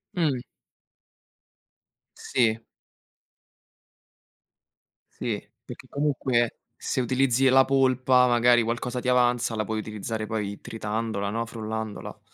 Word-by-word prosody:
Mh. 140 Hz, -8 st, 0 dB, 1.7 s
Sì. 115 Hz, -3 st, +1 dB, 2.5 s
Sì. -, -, -3 dB, 0.2 s
Perché -, -, -11 dB
comunque, 130 Hz, -5 st, 0 dB, 0.2 s
se 130 Hz, -, -2 dB
utilizzi 130 Hz, +1 st, +2 dB
la 135 Hz, +1 st, +6 dB
polpa, 130 Hz, -1 st, +3 dB
magari 120 Hz, 0 st, +4 dB
qualcosa 120 Hz, +2 st, -2 dB
ti 125 Hz, -, -5 dB
avanza, 120 Hz, -2 st, +2 dB
la 110 Hz, -, 0 dB
puoi 110 Hz, 0 st, -2 dB
utilizzare 110 Hz, +1 st, -4 dB
poi 105 Hz, -2 st, -3 dB
tritandola, 110 Hz, -2 st, -3 dB
no, 115 Hz, +2 st, -2 dB
frullandola. 110 Hz, -2 st, -6 dB
120 Hz, 95 wpm, -26 LUFS, 110-130 Hz, 2.5 s, la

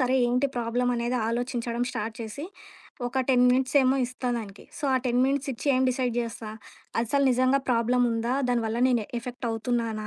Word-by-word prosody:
సరే 255 Hz, 0 st, +2 dB
ఏంటి 250 Hz, +3 st, +2 dB
ప్రాబ్లమనేది 240 Hz, +1 st, 0 dB
ఆలోచించడం 240 Hz, 0 st, -2 dB
స్టార్ట్ 220 Hz, -1 st, -4 dB
చేసి 230 Hz, +6 st, -6 dB, 0.6 s
ఒక 260 Hz, +2 st, -1 dB
10 250 Hz, -2 st, +5 dB
మినిట్సేమో 260 Hz, +1 st, +3 dB
ఇస్తా 255 Hz, 0 st, -4 dB
దానికి. 205 Hz, -3 st, -8 dB
సో, 290 Hz, -, -5 dB
ఆ -, -, +4 dB
10 245 Hz, 0 st, +2 dB
మినిట్సిచ్చి 275 Hz, -1 st, -2 dB
ఏం 255 Hz, -, +2 dB
డిసైడ్ 250 Hz, -1 st, 0 dB
జేస్తా? 230 Hz, -1 st, -5 dB, 0.5 s
అసలు 280 Hz, +5 st, +1 dB
నిజంగా 255 Hz, +2 st, +3 dB
ప్రాబ్లముందా? 240 Hz, 0 st, +1 dB, 0.2 s
దానివల్ల 230 Hz, -2 st, 0 dB
నేను 240 Hz, -4 st, +1 dB
ఎఫెక్టవుతున్నానా 230 Hz, -2 st, -3 dB
245 Hz, 145 wpm, -26 LUFS, 230-255 Hz, 0.6 s, 10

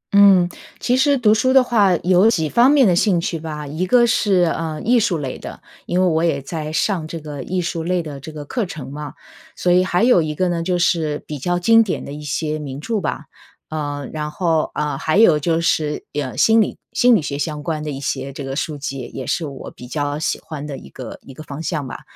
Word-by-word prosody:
嗯， 195 Hz, -3 st, +7 dB, 0.3 s
其 250 Hz, -, +1 dB
实 280 Hz, +1 st, +3 dB
读 215 Hz, -3 st, +4 dB
书 255 Hz, +4 st, +2 dB
的 265 Hz, -1 st, +7 dB
话， 205 Hz, -7 st, +3 dB
有 185 Hz, +4 st, +5 dB
几 160 Hz, -8 st, +1 dB
方 240 Hz, -, +4 dB
面 280 Hz, -3 st, +5 dB
的 175 Hz, -, +3 dB
兴 185 Hz, -1 st, +3 dB
趣 165 Hz, -1 st, -3 dB
吧。 150 Hz, -2 st, -6 dB
一 160 Hz, +6 st, -3 dB
个 240 Hz, +3 st, +5 dB
是， 205 Hz, -5 st, +2 dB
呃， 160 Hz, -2 st, -4 dB
艺 240 Hz, +1 st, +4 dB
术 195 Hz, -6 st, +1 dB
类 135 Hz, -3 st, -5 dB
的， -, -, -9 dB, 0.3 s
因 180 Hz, +1 st, 0 dB
为 -, -, +4 dB
我 165 Hz, -1 st, +2 dB
也 160 Hz, -5 st, +1 dB
在 155 Hz, +2 st, -5 dB
上 165 Hz, -1 st, 0 dB
这 165 Hz, -, -6 dB
个 150 Hz, -2 st, -7 dB
艺 180 Hz, +6 st, -2 dB
术 165 Hz, -1 st, -3 dB
类 180 Hz, 0 st, 0 dB
的 145 Hz, -3 st, -7 dB
这 155 Hz, +4 st, -9 dB
个 150 Hz, -1 st, -8 dB
课 235 Hz, -, -2 dB
程 135 Hz, -6 st, -8 dB
嘛。 150 Hz, +1 st, -7 dB, 0.4 s
所 180 Hz, -, +1 dB
以 180 Hz, +1 st, +5 dB
还 185 Hz, +3 st, +1 dB
有 240 Hz, -8 st, +5 dB
一 155 Hz, -1 st, -3 dB
个 185 Hz, +1 st, +1 dB
呢， 170 Hz, -1 st, -1 dB
就 180 Hz, +1 st, 0 dB
是 160 Hz, -3 st, 0 dB
比 150 Hz, -2 st, -6 dB
较 175 Hz, +5 st, 0 dB
经 225 Hz, +6 st, +5 dB
典 205 Hz, -5 st, -2 dB
的 -, -, -8 dB
一 150 Hz, -, -8 dB
些 155 Hz, +1 st, -2 dB
名 140 Hz, -2 st, -6 dB
著 220 Hz, +4 st, -2 dB
吧， 145 Hz, -, -3 dB, 0.4 s
呃， 145 Hz, -3 st, -4 dB
然 150 Hz, -1 st, -3 dB
后， 160 Hz, -1 st, 0 dB
呃， 150 Hz, -2 st, -2 dB
还 160 Hz, +5 st, 0 dB
有 170 Hz, -9 st, +6 dB
就 165 Hz, +1 st, +1 dB
是 155 Hz, -2 st, 0 dB
呀 140 Hz, -4 st, -3 dB
心 225 Hz, 0 st, +5 dB
理 -, -, -1 dB
心 245 Hz, -1 st, +5 dB
理 180 Hz, -, +2 dB
学 140 Hz, 0 st, -4 dB
相 150 Hz, -2 st, -3 dB
关 160 Hz, -3 st, -2 dB
的 150 Hz, -, -4 dB
一 135 Hz, -1 st, -5 dB
些 140 Hz, 0 st, -3 dB
这 140 Hz, +1 st, -7 dB
个 135 Hz, 0 st, -4 dB
书 145 Hz, +2 st, -3 dB
籍， 135 Hz, -3 st, -5 dB
也 130 Hz, -, -5 dB
是 160 Hz, +3 st, -1 dB
我 140 Hz, -2 st, -8 dB
比 125 Hz, -, -12 dB
较 145 Hz, +1 st, -2 dB
喜 160 Hz, -, -1 dB
欢 150 Hz, -2 st, -7 dB
的 140 Hz, -2 st, -6 dB
一 -, -, -12 dB
个 125 Hz, -4 st, -8 dB
一 135 Hz, -, -12 dB
个 155 Hz, -, -11 dB
方 145 Hz, 0 st, -7 dB
向 150 Hz, -6 st, -2 dB
吧。 -, -, -8 dB
160 Hz, 265 characters per minute, -20 LUFS, 150-185 Hz, 0.4 s, 嗯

